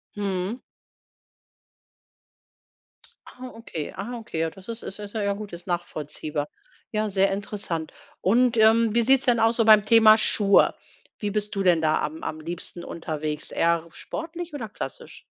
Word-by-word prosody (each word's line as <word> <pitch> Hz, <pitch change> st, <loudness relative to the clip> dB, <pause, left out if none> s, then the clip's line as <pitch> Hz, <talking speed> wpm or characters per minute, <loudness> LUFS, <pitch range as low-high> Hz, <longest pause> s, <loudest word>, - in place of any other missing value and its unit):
Mhm. 200 Hz, +2 st, -2 dB, 2.7 s
Ah, 255 Hz, 0 st, -10 dB
okay, 170 Hz, -9 st, -6 dB
ah, 235 Hz, +5 st, -5 dB
okay. 225 Hz, -8 st, -6 dB
Ja 165 Hz, -, 0 dB
das 190 Hz, +3 st, -16 dB
ist 230 Hz, 0 st, -6 dB
ist 195 Hz, -, -8 dB
ist 205 Hz, -1 st, -8 dB
ja 220 Hz, -, -2 dB
'n 200 Hz, -, -3 dB
gut, 210 Hz, -3 st, -8 dB
ist 170 Hz, +2 st, -9 dB
nachvollziehbar. 155 Hz, -3 st, -3 dB, 0.4 s
Ja 215 Hz, -1 st, -1 dB
sehr 195 Hz, 0 st, +3 dB
interessant 195 Hz, -5 st, -3 dB, 0.3 s
und, 235 Hz, +4 st, +3 dB
ähm, 225 Hz, +1 st, +5 dB
wie 235 Hz, -, +5 dB
sieht's 265 Hz, +3 st, +4 dB
denn 240 Hz, -3 st, +3 dB
aus 225 Hz, +1 st, +3 dB
so 230 Hz, -, +3 dB
beim 215 Hz, -2 st, +7 dB
Thema 220 Hz, 0 st, +7 dB
Schuhe 205 Hz, -2 st, +4 dB, 0.5 s
wie 205 Hz, -1 st, -1 dB
bist 210 Hz, 0 st, -2 dB
du 195 Hz, -, 0 dB
denn 175 Hz, -3 st, +4 dB
da 155 Hz, -1 st, +2 dB
am 155 Hz, +2 st, -4 dB
am 155 Hz, -, -4 dB
liebsten 170 Hz, +2 st, -5 dB
unterwegs, 155 Hz, -2 st, -4 dB
eher 170 Hz, 0 st, +1 dB
sportlich 330 Hz, -, -7 dB
oder 240 Hz, -7 st, -5 dB
klassisch? 475 Hz, -, -8 dB
205 Hz, 160 wpm, -25 LUFS, 170-225 Hz, 2.7 s, beim